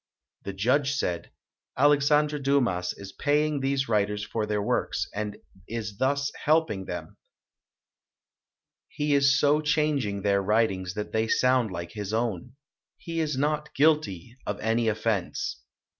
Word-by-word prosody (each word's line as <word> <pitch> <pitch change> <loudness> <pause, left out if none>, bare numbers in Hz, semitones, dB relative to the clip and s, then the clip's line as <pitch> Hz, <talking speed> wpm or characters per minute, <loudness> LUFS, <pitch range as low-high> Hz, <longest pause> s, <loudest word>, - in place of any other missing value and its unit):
The 100 - -6
judge 130 +8 +2
said, 90 -10 -2 0.5
"Alex 145 +1 +4
andre 150 0 +3
Dumas 125 -11 +1
is 100 -1 -9
paying 150 0 +1
these 135 0 0
writers 105 -1 0
for 110 0 -2
their 105 -1 0
works 85 -4 -1
and 105 0 -4 0.3
is 110 -3 -5
thus 140 +2 +1
helping 150 -11 +2
them. - - -7 1.7
He 150 0 -1
is 140 0 +4
so 150 +1 +3
chang 150 -1 +1
ing 100 -3 -3
their 100 -1 +2
writings 95 -3 +1
that 105 0 -4
they 110 0 +1
sound 125 -1 +3
like 85 -2 -6
his 105 +1 -5
own. 115 +1 -2 0.4
He 165 -1 -5
is 150 -4 -1
not 150 +2 -1
guilty 135 - +1
of - - -2
any 115 +1 +1
offense". 110 - -1
115 Hz, 145 wpm, -27 LUFS, 105-145 Hz, 1.7 s, Alex